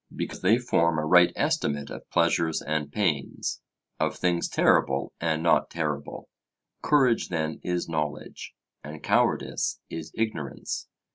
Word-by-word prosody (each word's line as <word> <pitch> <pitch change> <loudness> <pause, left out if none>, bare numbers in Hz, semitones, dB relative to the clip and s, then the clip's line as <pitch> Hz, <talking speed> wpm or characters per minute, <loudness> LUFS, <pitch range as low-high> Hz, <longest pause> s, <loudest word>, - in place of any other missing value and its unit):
because - - -5
they 105 +5 +4
form 85 -9 +1
a 75 - 0
right 90 +2 +6
estimate 145 - -1
of - - -9
pleasures 85 -1 +2
and 75 0 -2
pains, 80 -7 -1 0.4
of - - 0
things 90 -1 0
terrible - - +2
and 80 -1 0
not 85 - +3
terrible. 75 -4 -4 0.5
Courage 130 -6 +3
then 80 -2 -2
is 90 -1 -1
knowledge, 75 -2 -4 0.3
and 75 +1 -9
cowardice - - +1
is 80 -1 -6
ignorance. 110 - -3
80 Hz, 130 wpm, -27 LUFS, 75-90 Hz, 0.5 s, right